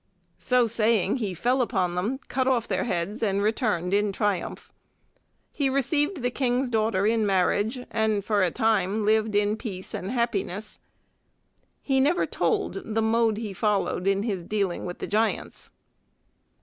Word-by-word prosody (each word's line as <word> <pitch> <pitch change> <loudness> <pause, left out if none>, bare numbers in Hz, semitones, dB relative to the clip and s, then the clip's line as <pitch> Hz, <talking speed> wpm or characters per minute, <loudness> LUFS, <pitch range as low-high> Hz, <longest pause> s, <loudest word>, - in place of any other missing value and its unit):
So 250 -1 +3
saying 220 -1 +1
he 205 -7 -3
fell 250 +9 +1
upon 190 -7 0
them, 205 +9 -1
cut 260 0 -1
off 245 -3 +1
their - - -1
heads, 195 +1 -2
and 200 -3 +1
returned 205 -4 0
in 205 0 +2
triumph. 205 -1 -2 0.8
He 280 -2 0
received 290 +3 0
the 245 - +1
King's 250 0 0
daughter 215 -3 +1
in 225 +1 +2
marriage 205 +5 +1
and 215 -3 0
for 210 -2 +2
a 185 - +3
time 215 -1 +1
lived 215 0 +2
in 205 +1 +2
peace 190 -6 -7
and 190 - -4
happiness. 215 -4 -2 1.0
He 270 -2 +2
never 300 +7 +3
told 390 - -1
the 225 0 -1
mode 225 -1 +2
he 215 -3 -4
followed 195 -2 0
in 195 +1 +2
his 200 -6 -2
dealing 200 -2 -2
with 175 - -6
the - - -4
giants. 220 +2 -1
215 Hz, 155 wpm, -26 LUFS, 200-240 Hz, 1.0 s, So